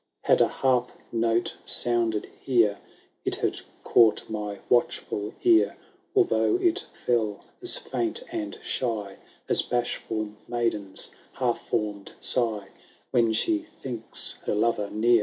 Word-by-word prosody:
Had - - +4
a - - +6
harp 125 -2 +1 0.2
note 115 0 +1
sounded 115 -3 0
here. 115 -6 +3 0.4
It - - 0
had - - -1 0.2
caught 115 -3 +5
my 105 -2 -4
watchful 110 -3 +1
ear. 350 -1 +5 0.4
Although 375 -1 +4
it 365 +2 +1 0.2
fell 110 -4 +1 0.2
as 360 +5 -1
fiunt 410 -2 -2
and 325 -3 -3
shy 105 -6 -2 0.3
As - - +4
bashful 115 -3 -2 0.2
maiden^s 115 -5 -1 0.3
hal^fonn*d 105 -5 -1
sigh, 110 -5 +1 0.4
When 115 -2 +4
she 320 - +2
thinks 130 - -3
her - - +2
lover 105 -1 +1
near." 115 +2 +4
115 Hz, 120 wpm, -27 LUFS, 105-130 Hz, 0.4 s, a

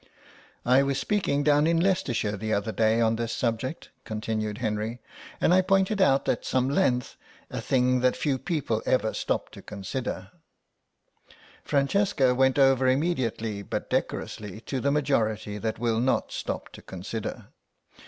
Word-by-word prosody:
"I 130 +2 +5
was 140 -1 0
speaking 180 -9 0
down 150 +1 +4
in 165 0 +3
Leicestershire 140 - 0
the 110 +1 -2
other 100 +2 -2
day 110 +1 +2
on 115 0 +2
this 115 0 -2
subject," 120 +5 -2
continued 110 -1 -3
Henry, 110 0 -2 0.4
"and 175 - +3
I 185 - +6
pointed 195 +2 +2
out 135 -6 +3
at 120 - 0
some 130 0 +1
length 130 -7 +1 0.3
a - - -4
thing 125 -1 +2
that 125 0 +2
few 140 -4 0
people 140 - -1
ever 110 -4 +2
stop - - -2
to - - -11
consider—" 100 -1 -5 1.3
Francesca 140 -2 +2
went 130 +1 +3
over 135 -2 +4
immediately 130 -7 0
but - - -5
decorously 105 -1 -3
to 135 +2 -3
the 140 - +1
majority 110 -8 0
that 110 +1 -2
will 115 -1 0
not 130 +2 +1
stop - - -4
to - - -13
consider. 95 +4 -6
125 Hz, 150 wpm, -27 LUFS, 110-140 Hz, 1.3 s, I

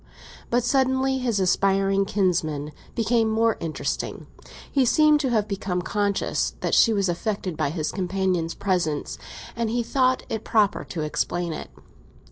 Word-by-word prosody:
But 245 0 +2
suddenly 265 +1 +2
his 235 -5 0
aspiring 195 +1 +2
kinsman 160 -7 0 0.2
became 230 0 +2
more 225 0 +2
interesting. 160 -2 -3 0.5
He 275 - +3
seemed 305 +4 +4
to 275 -3 0
have 215 -3 +1
become 190 -3 -2
conscious 200 +1 -1
that - - -1
she 230 - +6
was 200 -3 +1
affected 185 0 -2
by 145 - 0
his 155 0 -2
companion's 185 -3 -1
presence, 175 -7 -1 0.4
and 230 -1 -1
he 240 +1 0
thought 255 +1 +1
it 220 -1 -4
proper 210 -2 +2
to 165 - -5
explain 170 +2 -2
it. - - -7
200 Hz, 145 wpm, -24 LUFS, 180-235 Hz, 0.5 s, she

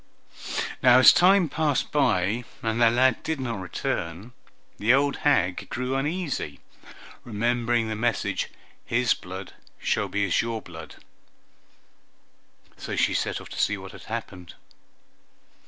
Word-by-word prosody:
Now 125 0 +7
as 130 - +9
time 185 0 +5
passed 150 -2 -1
by 115 -5 +1 0.2
and 115 +1 -1
the 115 - +7
lad 125 +1 +3
did 160 -2 -3
not 120 -6 -3
return, 90 +3 -4 0.5
the 115 +5 +4
old 140 +1 +1
hag 95 -12 +1
grew 125 +2 -2
uneasy, 145 - -3 0.6
remembering 120 +1 0
the 110 - -3
message 115 0 -1 0.3
"His 120 0 +2
blood 95 +1 -9 0.2
shall - - 0
be 100 0 0
as 95 - +2
your 115 -1 -3
blood"; - - -11 1.8
so - - -5
she - - +2
set - - -1
off - - -11
to - - -3
see 105 - +1
what 95 0 -9
had - - -13
happened. 100 -6 -7
120 Hz, 135 wpm, -25 LUFS, 100-130 Hz, 1.8 s, as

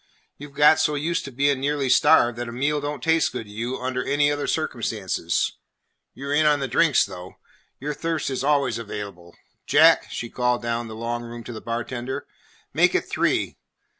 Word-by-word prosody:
You 145 +1 -9
've 140 - -24
got 150 +2 +6
so 150 - +1
used 165 +4 -1
to 140 - -7
being 140 +1 +1
nearly 140 0 -1
starved 120 -1 +5
that 120 -1 -4
a - - -6
meal 145 +5 -1
don't 145 -2 -5
taste 160 -1 +2
good 125 -2 -5
to 105 - -14
you 115 +5 -4
under 130 0 -2
any 145 +1 +2
other 145 0 -2
circumstances. 110 - -1 0.6
You 140 - -8
're 140 - -1
in 155 +1 +4
on 150 -1 +3
the 135 - -2
drinks, 150 -1 +3
though. 90 0 -10 0.4
Your 150 +2 -3
thirst 160 -2 -2
is 130 0 -2
always 140 -5 +1
available. 100 -6 -8 0.3
Jack," - - +5
she 120 - -5
called 125 0 -1
down 115 0 -2
the 110 - -8
long 120 +1 -3
room 120 0 -8
to 120 - -8
the 110 - -8
bartender, 120 +2 -4 0.5
"make - - +3
it - - 0
three. - - 0
130 Hz, 195 wpm, -24 LUFS, 115-145 Hz, 0.6 s, got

